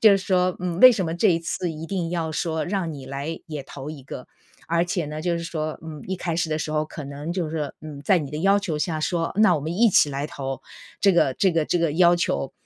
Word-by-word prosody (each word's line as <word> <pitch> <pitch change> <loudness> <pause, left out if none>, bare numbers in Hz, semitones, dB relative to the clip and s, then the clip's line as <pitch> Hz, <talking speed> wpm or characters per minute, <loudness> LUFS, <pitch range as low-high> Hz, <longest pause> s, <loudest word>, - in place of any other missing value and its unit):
就 220 - +8
是 195 - +5
说， 185 -2 +1
嗯， 180 0 -3
为 255 - +11
什 205 -6 0
么 160 - -2
这 195 +5 +3
一 165 - +3
次 170 +1 -3
一 160 +1 -7
定 175 -3 -2
要 165 -2 -2
说 160 0 -1
让 180 -3 -2
你 140 -2 -9
来 140 +4 -4
也 150 -3 -5
投 135 +1 -9
一 150 -3 -8
个， 125 -1 -8 0.4
而 170 +1 +2
且 175 -3 -2
呢， 155 +1 -5
就 175 -1 0
是 170 - -5
说， 155 -2 -3
嗯， 160 -2 -8
一 190 - -1
开 170 -2 -3
始 165 -1 0
的 155 - 0
时 155 0 -3
候 155 0 +1
可 155 -1 -8
能 145 +4 -5
就 175 -4 -2
是， 155 -2 -3
嗯， 150 -2 -8
在 180 +5 +4
你 145 -2 -6
的 150 - -3
要 195 +4 +4
求 170 -6 -3
下 155 +1 -1
说， 165 +1 -1
那 210 -5 +5
我 150 - -1
们 160 +3 -3
一 230 +3 +5
起 150 -7 +4
来 140 +1 -3
投 135 -3 -5 0.4
这 195 -2 +5
个 140 -6 +3
这 190 -2 +2
个 165 -2 +2
这 175 - 0
个 165 -3 +1
要 175 +1 +5
求。 70 - -1
165 Hz, 290 characters per minute, -24 LUFS, 150-180 Hz, 0.4 s, 为